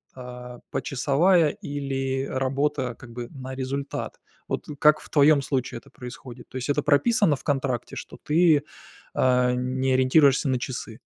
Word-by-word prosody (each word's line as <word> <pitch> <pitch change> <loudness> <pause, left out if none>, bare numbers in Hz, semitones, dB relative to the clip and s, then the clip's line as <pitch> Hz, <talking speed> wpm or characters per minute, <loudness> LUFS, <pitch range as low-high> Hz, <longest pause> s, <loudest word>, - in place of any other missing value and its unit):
а, 125 -1 -9
почасовая, 155 +5 +2
или 135 -2 -3
работа 135 0 -1
как 120 0 -13
бы 120 0 -6
на 130 -3 -7
результат. 135 +1 -4 0.3
Вот - - -3
как 155 0 +5
в - - -14
твоем 145 -1 +5
случае 130 -3 -2
это - - -21
происходит? 125 0 -10
То - - -16
есть 130 +2 -4
это 145 0 +1
прописано 160 +3 +3
в - - -13
контракте, 135 -4 -2
что - - -8
ты, 155 -1 +4 0.5
а, 125 -1 +3
не 130 +1 -1
ориентируешься 135 +2 +4
на 130 -1 +1
часы? 125 0 -6
135 Hz, 150 wpm, -25 LUFS, 125-145 Hz, 0.5 s, как